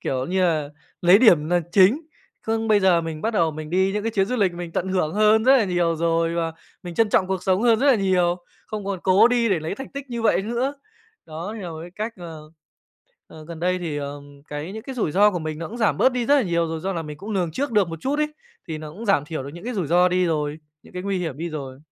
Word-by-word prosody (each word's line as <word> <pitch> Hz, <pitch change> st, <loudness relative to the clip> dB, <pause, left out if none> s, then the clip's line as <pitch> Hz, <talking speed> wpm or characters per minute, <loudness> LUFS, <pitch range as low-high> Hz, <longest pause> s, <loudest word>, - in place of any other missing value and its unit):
kiểu 130 Hz, 0 st, -2 dB
như 185 Hz, +2 st, 0 dB
là, 155 Hz, -5 st, +1 dB, 0.3 s
lấy 180 Hz, +3 st, +6 dB
điểm 170 Hz, -11 st, +5 dB
là 175 Hz, 0 st, +3 dB
chính. 200 Hz, +9 st, +5 dB, 0.4 s
Khương 225 Hz, 0 st, -1 dB
bây 210 Hz, -1 st, +4 dB
giờ 185 Hz, -3 st, +4 dB
mình 160 Hz, -2 st, -6 dB
bắt 225 Hz, -, +1 dB
đầu 165 Hz, -5 st, +2 dB
mình 155 Hz, 0 st, -8 dB
đi 190 Hz, +2 st, +2 dB
những 210 Hz, +1 st, -2 dB
cái 225 Hz, 0 st, -2 dB
chuyến 195 Hz, -1 st, +2 dB
du 250 Hz, +4 st, -2 dB
lịch 195 Hz, -5 st, +2 dB
mình 175 Hz, -1 st, -7 dB
tận 185 Hz, -, -2 dB
hưởng 185 Hz, -4 st, 0 dB
hơn 215 Hz, +1 st, +4 dB
rất 265 Hz, +2 st, +7 dB
là 240 Hz, -, +3 dB
nhiều 175 Hz, -3 st, 0 dB
rồi 165 Hz, 0 st, +1 dB
và 165 Hz, -1 st, -1 dB, 0.3 s
mình 175 Hz, -2 st, -7 dB
trân 225 Hz, +2 st, +3 dB
trọng 190 Hz, -, +2 dB
cuộc 190 Hz, -1 st, -2 dB
sống 190 Hz, +3 st, +1 dB
hơn 230 Hz, -2 st, +4 dB
rất 275 Hz, -, +1 dB
là 275 Hz, -, +6 dB
nhiều, 185 Hz, -4 st, +2 dB, 0.3 s
không 210 Hz, -2 st, -5 dB
còn 195 Hz, -2 st, -3 dB
cố 195 Hz, +5 st, +5 dB
đi 240 Hz, -2 st, +2 dB
để 180 Hz, -5 st, +1 dB
lấy 160 Hz, +5 st, -4 dB
thành 270 Hz, +4 st, -8 dB
tích 280 Hz, -1 st, -8 dB
như 235 Hz, -1 st, -3 dB
vậy 215 Hz, -3 st, +3 dB
nữa. 240 Hz, +6 st, -2 dB, 0.5 s
Đó, 165 Hz, +6 st, -6 dB
thì 220 Hz, -, -7 dB
là 175 Hz, -, -5 dB
một 160 Hz, -1 st, -7 dB
cái 170 Hz, +2 st, -9 dB
cách, 215 Hz, +5 st, -4 dB
ờ, 160 Hz, -4 st, -10 dB, 0.8 s
ờ, 155 Hz, -, -13 dB
gần 165 Hz, 0 st, -9 dB
đây 180 Hz, +1 st, +1 dB
thì, 165 Hz, -4 st, -4 dB
ờm, 145 Hz, 0 st, -8 dB
cái 150 Hz, +5 st, -5 dB
những 220 Hz, -, -7 dB
cái 265 Hz, +2 st, -7 dB
rủi 215 Hz, -11 st, -1 dB
ro 205 Hz, +2 st, +5 dB
của 180 Hz, -, -3 dB
mình 155 Hz, -1 st, -5 dB
nó 165 Hz, -, -5 dB
cũng 230 Hz, -, -8 dB
giảm 220 Hz, -3 st, +1 dB
bớt 260 Hz, -, +4 dB
đi 245 Hz, -2 st, -2 dB
rất 285 Hz, -, +5 dB
là 275 Hz, -, +3 dB
nhiều 170 Hz, -4 st, 0 dB
rồi 160 Hz, 0 st, -4 dB
do 190 Hz, +3 st, -2 dB
là 170 Hz, -3 st, -3 dB
mình 150 Hz, -1 st, -8 dB
cũng 205 Hz, +4 st, -8 dB
lường 185 Hz, -5 st, 0 dB
trước 270 Hz, -, -2 dB
được 205 Hz, -5 st, +3 dB
một 165 Hz, -1 st, -7 dB
chút 280 Hz, -, -1 dB
ấy. 300 Hz, 0 st, 0 dB, 0.4 s
Thì 160 Hz, -1 st, -4 dB
nó 155 Hz, -1 st, -8 dB
cũng 220 Hz, +8 st, -8 dB
giảm 185 Hz, -8 st, +3 dB
thiểu 155 Hz, -2 st, -5 dB
được 140 Hz, -, -7 dB
những 175 Hz, -, -10 dB
cái 245 Hz, 0 st, -4 dB
rủi 180 Hz, -7 st, -1 dB
ro 180 Hz, +3 st, +4 dB
đi 180 Hz, 0 st, +1 dB
rồi, 150 Hz, -2 st, -1 dB, 0.2 s
những -, -, -18 dB
cái 180 Hz, -, -5 dB
nguy 195 Hz, -1 st, -1 dB
hiểm 160 Hz, -6 st, -4 dB
đi 170 Hz, +2 st, -4 dB
rồi. 135 Hz, -4 st, -7 dB
180 Hz, 285 wpm, -23 LUFS, 165-215 Hz, 0.8 s, rất